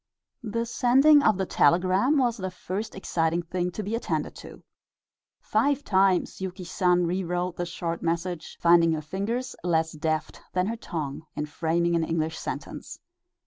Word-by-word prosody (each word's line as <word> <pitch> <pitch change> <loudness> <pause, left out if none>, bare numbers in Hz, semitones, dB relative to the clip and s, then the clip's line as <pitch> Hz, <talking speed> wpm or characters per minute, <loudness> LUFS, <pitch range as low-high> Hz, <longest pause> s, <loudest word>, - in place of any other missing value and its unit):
The 230 0 -2
sending 270 +5 +5
of 215 -7 +3
the 190 - 0
telegram 185 - +3
was 245 -3 +2
the 190 -2 -3
first 185 +4 -5
exciting 170 -2 0
thing 180 +1 -2
to 215 - -4
be 205 +3 -4
attended 230 - -2
to. - - -12 0.8
Five 285 0 +1
times 190 -1 +2
Yuki 185 0 -5
San 180 0 +2
rewrote 180 0 -1
the 175 - -3
short 170 0 -4
message, 170 0 -3
finding 170 -1 +5
her 155 - -2
fingers 225 - -3
less 160 -2 +1
deft 155 0 -3
than 180 0 +1
her 225 +3 -2
tongue 160 -7 -5
in 150 - -2
framing 165 +3 0
an 165 - +2
English 160 0 -2
sentence. - - -6
180 Hz, 155 wpm, -26 LUFS, 165-210 Hz, 0.8 s, sending